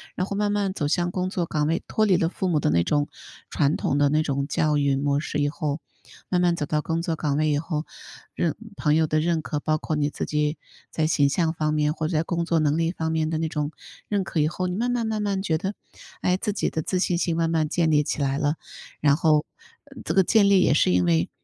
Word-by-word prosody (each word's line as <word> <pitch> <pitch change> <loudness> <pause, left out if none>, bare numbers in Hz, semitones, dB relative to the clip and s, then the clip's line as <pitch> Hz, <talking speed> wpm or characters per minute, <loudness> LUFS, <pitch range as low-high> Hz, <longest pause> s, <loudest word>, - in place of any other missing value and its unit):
然 185 +2 -1
后 200 - -4
慢 205 0 0
慢 200 -2 0
走 150 - -2
向 175 +1 +1
工 185 0 -2
作 180 -3 -1
岗 150 -2 -1
位， 165 +1 0
脱 215 - +1
离 190 -4 +4
了 165 - +1
父 185 +1 -2
母 155 -3 +2
的 - - +1
那 85 +2 +3
种 145 - +1 0.4
传 145 +1 +1
统 140 - 0
的 145 -1 +3
那 155 +1 +2
种 140 -2 -1
教 150 0 +1
育 140 -1 +2
模 140 0 +1
式 150 - -4
以 145 - +2
后， 150 0 -3 0.5
慢 180 -1 +2
慢 175 -1 +3
走 150 - -2
到 150 +1 0
工 165 +2 -2
作 165 -1 -1
岗 145 -2 -1
位 155 0 +2
以 145 - +2
后， 155 0 -3 0.5
认 165 -3 -1 0.2
朋 150 -4 +1
友 160 0 +3
的 155 0 +1
认 165 -1 +1
可， 150 -1 -3
包 155 +1 +1
括 155 - -3
你 145 0 +1
自 - - -4
己 150 +1 -1 0.3
在 155 -1 0
形 145 -3 +3
象 160 +2 +1
方 155 -1 -1
面， 150 0 +1
或 155 -1 -2
者 160 - 0
在 160 - +2
工 170 0 -1
作 170 -1 +1
能 150 0 +2
力 165 0 +1
方 160 -3 -3
面 160 -1 0
的 160 - -1
那 160 +1 -1
种 150 -1 -2 0.4
认 200 -2 +1
可 160 - -1
以 155 - +2
后， 185 +1 -3
你 180 - -3
慢 240 +4 0
慢 235 -2 -1
慢 215 -1 -1
慢 200 -2 -1
觉 160 -5 0
得， 195 +5 -4 0.5
哎， 180 - +2
自 210 +3 -2
己 200 - -1
的 160 - -2
自 185 +4 -1
信 180 -1 +1
心 170 -1 0
慢 165 -1 +1
慢 160 -2 +1
建 165 0 +1
立 150 -1 +4
起 150 - -3
来 135 0 0
了， 145 +1 +1 0.4
然 145 -1 +4
后， 155 -2 +3 0.4
呃， - - -16
这 160 - -2
个 190 0 +5
建 205 +1 +4
立 195 -2 +6
也 155 - +4
是 120 - +3
因 90 0 +3
为 85 -1 +2
160 Hz, 290 characters per minute, -24 LUFS, 150-175 Hz, 0.5 s, 立